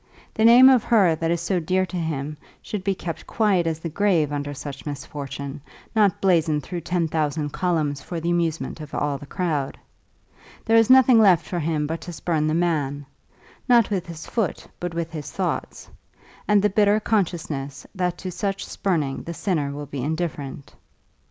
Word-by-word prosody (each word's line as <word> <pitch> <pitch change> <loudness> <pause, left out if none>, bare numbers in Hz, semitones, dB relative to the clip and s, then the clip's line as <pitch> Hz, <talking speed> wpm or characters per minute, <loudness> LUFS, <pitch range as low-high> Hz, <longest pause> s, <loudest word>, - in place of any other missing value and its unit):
The 220 - 0
name 245 +3 +9
of 260 -4 +6
her 200 -8 +4
that 165 +1 -1
is 170 0 0
so 180 +1 0
dear 185 +3 +1
to 185 - -8
him 155 -3 -3 0.3
should 210 -3 -5
be 195 0 0
kept 170 -2 -6
quiet 200 -6 +2
as 160 -1 -1
the 165 - -5
grave 165 -4 +1
under 145 0 -3
such 140 -1 -7
misfortune, 140 0 -6 0.3
not 205 -4 +3
blazoned 160 -6 +2
through 175 +5 -5
ten 170 0 0
thousand 150 -1 -1
columns 155 -6 -1
for 170 - -5
the 170 +1 -1
amusement 165 -2 -1
of 150 - -8
all 145 -2 -1
the 145 - -11
crowd. 155 -7 -2 0.9
There 225 - +3
is 225 0 +5
nothing 255 -2 +7
left 185 -6 +5
for 175 - -3
him 155 -1 0
but 165 +2 -4
to 175 - -7
spurn 155 0 -1
the 155 - +1
man, 145 -5 0 0.6
not 235 -4 +5
with 185 -3 -1
his 165 -2 -8
foot 220 -8 -2
but 175 -1 -4
with 165 -1 -3
his 155 -4 -6
thoughts; 185 -3 -3 0.6
and 210 -1 +4
the 210 - +4
bitter 205 +1 +4
consciousness 160 -10 -2
that 180 -3 -1
to 185 - -5
such 195 +2 -3
spurning 155 -8 -1
the 170 - -7
sinner 155 -8 -1
will 145 +1 -6
be 140 -2 -5
indifferent. 145 -2 -4
165 Hz, 185 wpm, -23 LUFS, 150-190 Hz, 0.9 s, name